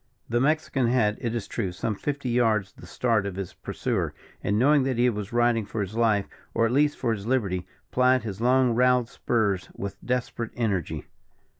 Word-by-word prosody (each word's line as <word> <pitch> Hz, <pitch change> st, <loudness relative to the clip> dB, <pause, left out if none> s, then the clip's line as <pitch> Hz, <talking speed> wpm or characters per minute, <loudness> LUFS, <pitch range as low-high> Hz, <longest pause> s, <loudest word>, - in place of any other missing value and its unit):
The 120 Hz, +1 st, +1 dB
Mexican 145 Hz, -3 st, +1 dB
had, 115 Hz, -4 st, +2 dB
it 115 Hz, -1 st, -2 dB
is 110 Hz, -4 st, -3 dB
true, 100 Hz, -6 st, -2 dB
some 105 Hz, +5 st, -2 dB
fifty 140 Hz, +4 st, -3 dB
yards 110 Hz, -5 st, +2 dB
the -, -, -13 dB
start 115 Hz, -5 st, +1 dB
of 95 Hz, -, -5 dB
his 95 Hz, -2 st, -5 dB
pursuer, -, -, -2 dB, 0.3 s
and 100 Hz, -, +1 dB
knowing 145 Hz, +5 st, +5 dB
that 130 Hz, -2 st, 0 dB
he 125 Hz, +1 st, +4 dB
was 105 Hz, -2 st, -5 dB
riding 120 Hz, -1 st, +2 dB
for 105 Hz, +2 st, -5 dB
his 100 Hz, +1 st, -4 dB
life, 110 Hz, -4 st, +2 dB, 0.3 s
or 115 Hz, -, +3 dB
at 115 Hz, -, +1 dB
least 145 Hz, +3 st, +3 dB
for 115 Hz, -, 0 dB
his 105 Hz, -1 st, -6 dB
liberty, 95 Hz, -8 st, 0 dB, 0.2 s
plied 125 Hz, -1 st, +3 dB
his 105 Hz, -2 st, -5 dB
long 125 Hz, 0 st, +4 dB
roweled 125 Hz, 0 st, +3 dB
spurs 105 Hz, -8 st, 0 dB
with 100 Hz, 0 st, -6 dB
desperate 125 Hz, -2 st, -2 dB
energy. 105 Hz, -8 st, -1 dB
115 Hz, 190 wpm, -26 LUFS, 105-125 Hz, 0.3 s, knowing